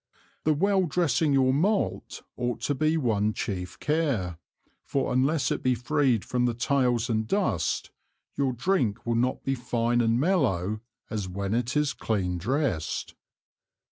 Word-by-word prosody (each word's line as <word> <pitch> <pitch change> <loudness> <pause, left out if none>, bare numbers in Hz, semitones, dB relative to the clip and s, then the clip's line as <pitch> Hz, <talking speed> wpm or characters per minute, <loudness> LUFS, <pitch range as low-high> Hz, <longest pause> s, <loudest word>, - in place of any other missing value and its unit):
The 155 - +4
well 190 +2 +2
dressing 160 -2 +1
your 130 -1 +4
Malt, 195 +9 0
ought 120 -1 -2
to 145 - 0
be 155 +4 +1
one 110 -6 +1
chief 90 -4 -4
Care; 135 - 0 0.4
for 135 -2 -1
unless 135 +2 +2
it - - -1
be 130 -1 +2
freed 125 -2 +1
from 125 -1 +1
the 120 - -1
Tails 120 -2 +1
and 110 -1 0
Dust, 110 - 0 0.4
your 135 -2 +1
Drink 125 - 0
will 120 - 0
not 125 +2 0
be 135 - 0
fine 120 -1 0
and 115 0 +2
mellow 115 - +1 0.3
as 105 -4 -2
when 100 +2 -3
it 120 +4 0
is 150 -1 +1
clean 90 -5 -1
dressed. 120 - -1
125 Hz, 150 wpm, -27 LUFS, 110-145 Hz, 0.4 s, The